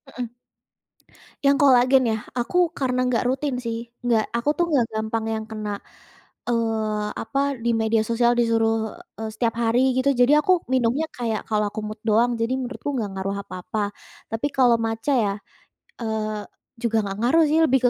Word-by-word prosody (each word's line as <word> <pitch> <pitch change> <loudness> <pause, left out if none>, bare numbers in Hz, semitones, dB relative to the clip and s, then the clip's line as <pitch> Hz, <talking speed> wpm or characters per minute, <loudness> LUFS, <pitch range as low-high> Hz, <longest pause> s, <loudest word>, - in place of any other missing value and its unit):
Heeh. 245 -1 -3 1.2
Yang 280 0 +5
kolagen 260 -1 +5
ya, 220 - 0 0.2
aku 250 +8 -1 0.2
karena 255 -2 0
nggak 250 -1 +1
rutin 270 0 -1
sih. 230 -1 -3 0.3
Nggak 225 -3 +3
aku 255 +5 0
tuh 345 - +3
nggak 255 -6 +3
gampang 220 +1 -2
yang 220 0 -3
kena, 215 -1 -5 0.8
eee, 220 -3 0
apa, 275 +4 -2 0.2
di 235 - +1
media 220 0 +2
sosial 240 +1 +3
disuruh, 225 -1 +1 0.2
eee, 220 0 -3
setiap 230 0 0
hari 230 +3 +3 0.2
gitu. 270 +2 +2
Jadi 265 +4 +6
aku 370 - +2 0.2
minumnya 255 +5 +2
kayak 225 -3 -1
kalau 210 -1 +1
aku 215 - -5
mood 215 0 -7
doang, 230 +3 +4
jadi 230 +3 0
menurutku 255 +3 -5
nggak 215 -5 -2
ngaruh 195 +1 -2
apa-apa. 185 +4 -5 0.5
Tapi 225 +6 -1
kalau 245 -3 +5
matcha 225 +5 -1
ya, 205 -4 +1 0.7
eee, 215 -1 -2 0.4
juga 225 -1 +1
nggak 195 0 -4
ngaruh 320 +7 +4
sih 315 +2 +3
lebih 265 -1 +3
230 Hz, 165 wpm, -23 LUFS, 220-255 Hz, 1.2 s, Jadi